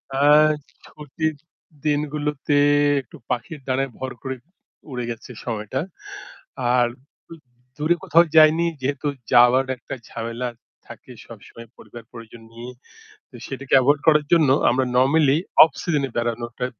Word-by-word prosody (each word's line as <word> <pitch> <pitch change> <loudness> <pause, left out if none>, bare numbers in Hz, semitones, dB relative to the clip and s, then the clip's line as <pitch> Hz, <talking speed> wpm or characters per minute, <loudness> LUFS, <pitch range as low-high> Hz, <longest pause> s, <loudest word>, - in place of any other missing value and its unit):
আ - - -1 0.7
ছুটির 155 +1 -4 0.5
দিনগুলোতে 150 -1 -1 0.5
একটু 125 - -18
পাখির 125 +5 -4
ডানায় 135 +1 -1
ভর 130 0 -5
করে 130 -1 -5 0.6
উড়ে 125 -1 -4
গেছে 120 +2 -8
সময়টা। 115 +2 -4 0.9
আর 120 -1 +3 0.9
দূরে 155 +4 +1
কোথাও 170 -1 +5
যায়নি 155 +2 +6 0.2
যেহেতু 140 +2 -3 0.3
যাওয়ার 125 +2 +5
একটা 120 - -9 0.2
ঝামেলা 115 +2 -5 0.4
থাকে 120 +2 -13 0.2
সবসময় 115 +1 -13
পরিবার 120 -2 -13
পরিজন 115 -1 -12
নিয়ে। 120 +2 -9 0.6
তো - - -16
সেটাকে 135 0 -6
এভয়েড 145 +3 +2
করার 150 -1 +4
জন্য 160 -5 +4 0.2
আমরা 130 +2 +1
নরমালি 140 +3 +3 0.3
অফ 160 - +3
সিজনে 150 -5 -1
এ - - -29
বেড়ানোটা 120 +1 -3
130 Hz, 125 wpm, -22 LUFS, 120-150 Hz, 0.9 s, যায়নি